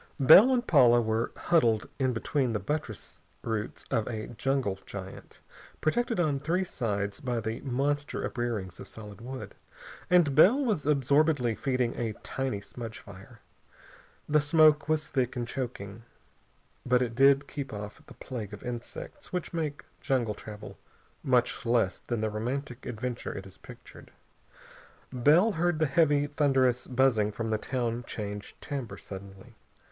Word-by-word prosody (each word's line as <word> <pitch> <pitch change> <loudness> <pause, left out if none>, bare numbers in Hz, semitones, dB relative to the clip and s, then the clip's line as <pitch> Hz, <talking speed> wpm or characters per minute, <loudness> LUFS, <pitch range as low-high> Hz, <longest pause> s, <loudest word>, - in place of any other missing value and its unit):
Bell 180 - +9
and 245 -1 +1
Paula 125 - +6
were 110 0 0
huddled 115 -11 +2
in 130 -1 +2
between 125 +1 -1
the 105 - 0
buttress 120 - -5 0.2
roots 110 -2 -4
of 110 - +1
a 110 -2 -4
jungle 120 -4 -1
giant, 95 -1 -9 0.4
protected 230 +7 0
on 150 -5 +1
three 170 +7 0
sides 105 - -3
by 125 -5 -2
the 110 +1 -4
monster 145 +2 -1
uprearings 110 -7 -3
of - - -9
solid 105 -1 -11
wood, 130 +2 -7 0.6
and 175 -6 +4
Bell 185 - +7
was 200 - -1
absorbedly 140 -3 +3
feeding 125 0 -1
a 115 -2 -2
tiny 130 -6 -2
smudge 115 +1 -8
fire. 100 +4 -13 0.9
The 150 0 +3
smoke 155 0 +4
was 155 -1 +1
thick 130 -3 -1
and 120 -1 -3
choking, 115 -5 -5 0.8
but 125 0 +3
it 120 -2 -3
did 140 +3 +5
keep 140 -2 -5
off 105 0 -7
the - - -13
plague 110 -6 -7
of 100 - -15
insects 120 -1 -7
which 180 -1 -3
make 155 -4 -3
jungle 120 -5 0
travel 105 0 -10 0.4
much 125 -2 +1
less 115 -5 +1
than 120 -3 -3
the 110 -1 -1
romantic 120 +4 -4
adventure 120 +1 -4
it 95 - -7
is 95 - -14
pictured. - - -13 1.0
Bell 150 - +5
heard 175 -2 0
the 155 - +2
heavy, 145 -1 +3
thunderous 135 -4 +1
buzzing 125 -5 +2
from 110 +1 -4
the 110 - +1
town 120 -1 -2
change 105 -1 -6
timbre 140 -6 -5
suddenly. 100 +4 -10
125 Hz, 150 wpm, -29 LUFS, 110-145 Hz, 1.0 s, Bell